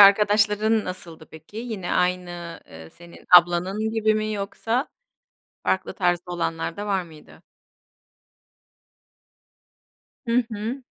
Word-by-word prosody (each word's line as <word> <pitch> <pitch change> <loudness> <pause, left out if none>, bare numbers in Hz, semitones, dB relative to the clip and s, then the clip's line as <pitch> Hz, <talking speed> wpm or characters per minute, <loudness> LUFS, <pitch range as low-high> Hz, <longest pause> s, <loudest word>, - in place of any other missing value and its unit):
arkadaşların 210 +2 +5
nasıldı 170 -3 -8
peki? 160 +6 -13
Yine 220 -6 -4
aynı, 175 -2 -1
eee, 80 0 -12
senin 170 0 -15
ablanın 180 +5 +2
gibi 220 -1 +2
mi 215 0 -1
yoksa 225 +6 -2 0.8
farklı 190 - 0
tarzda 175 -1 0
olanlar 165 -1 -2
da 205 - -4
var 195 -2 +1
mıydı? 160 -3 -16 2.9
Hı 235 +1 +2
hı. 225 +6 -4
195 Hz, 105 wpm, -24 LUFS, 175-215 Hz, 2.9 s, arkadaşların